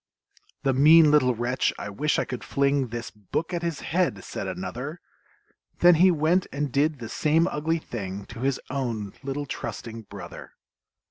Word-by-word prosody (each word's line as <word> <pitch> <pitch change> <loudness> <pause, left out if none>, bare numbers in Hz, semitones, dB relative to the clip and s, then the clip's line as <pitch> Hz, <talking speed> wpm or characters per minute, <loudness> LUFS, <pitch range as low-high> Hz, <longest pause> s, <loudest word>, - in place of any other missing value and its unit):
"The 135 - +2
mean 155 +3 +7
little 130 -5 +4
wretch, 120 +3 0
I 105 - -6
wish 150 +9 0
I - - +1
could 125 - -6
fling 140 -1 +1
This 120 0 -6
book 110 - -4
at 170 - -1
his 170 -3 -3
head!" 165 - 0
said - - -5
another; 105 - -5 0.8
Then 175 0 +7
he 180 +3 +6
went 170 +2 +2
and 145 -1 -2
did 150 +3 +2
the 120 -3 -7
same 155 +7 +2
ugly 165 -1 0
thing 100 - -6
To - - -10
his 135 +1 0
own 115 -7 -3
little 140 +2 -3
trusting 115 -3 -6
brother! - - -9
140 Hz, 170 wpm, -26 LUFS, 115-155 Hz, 0.8 s, mean